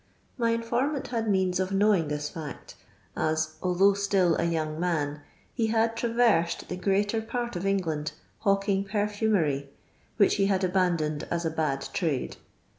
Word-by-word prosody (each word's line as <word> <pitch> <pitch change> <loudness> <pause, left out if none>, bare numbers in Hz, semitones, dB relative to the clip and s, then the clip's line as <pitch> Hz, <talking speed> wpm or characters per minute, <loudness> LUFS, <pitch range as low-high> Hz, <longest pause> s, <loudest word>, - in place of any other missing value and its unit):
My 230 -2 +1
in 230 0 0
fennant 260 +5 -1
had 225 -3 -1
means 190 -2 +1
of 185 0 -1
knowing 195 -4 +3
this 150 0 -3
fkct, 155 -3 -8 0.4
as 155 0 0
although 185 +2 +4
ftill 195 -4 +2
a - - +1
young 160 -2 -1
man, 150 -4 -1 0.3
he 230 -2 0
had 225 0 +1
traversed 230 -8 +1
the 180 - -3
greater 200 +4 +1
j 220 - -7
part 240 -1 -3
of 180 +2 -2
England 165 -6 -1 0.3
hawking 195 -1 +1
perfumery, 205 -9 0 0.5
which 205 -1 +4
he; 195 -1 +3
bad 195 -1 +1
abandoned 175 -5 0
as 170 0 -1
a 160 - 0
bad 140 -4 -1
trade. 155 -9 -1
190 Hz, 160 wpm, -27 LUFS, 160-210 Hz, 0.5 s, although